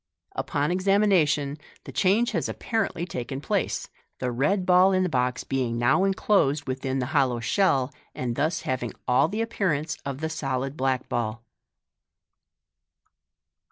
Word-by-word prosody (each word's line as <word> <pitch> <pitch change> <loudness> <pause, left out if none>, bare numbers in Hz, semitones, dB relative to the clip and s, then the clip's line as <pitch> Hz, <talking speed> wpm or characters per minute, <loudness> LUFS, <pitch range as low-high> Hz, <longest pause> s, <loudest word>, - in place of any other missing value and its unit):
Upon 145 +3 -1
examination, 180 -7 +2 0.2
the - - -9
change 195 - +2
has - - -1
apparently 200 -7 -2
taken 135 -4 -5
place, 140 - -1 0.3
the 125 -1 -2
red 165 +11 +1
ball 185 +1 +5
in 185 0 +3
the 180 - 0
box 125 -3 0
being 125 -3 -1
now 120 +11 +3
enclosed 190 -7 +2
within 130 0 -2
the 130 - -1
hollow 130 -5 +2
shell, 135 - +1 0.2
and 120 -2 -2
thus 155 +6 0
having 125 -2 -3
all 125 +4 +4
the 215 +6 -2
appearance 165 -9 -1
of 140 -1 -4
the 160 - -1
solid 135 -3 -3
black, 130 -3 -1
ball. 115 -1 -2
140 Hz, 140 wpm, -26 LUFS, 130-185 Hz, 0.3 s, ball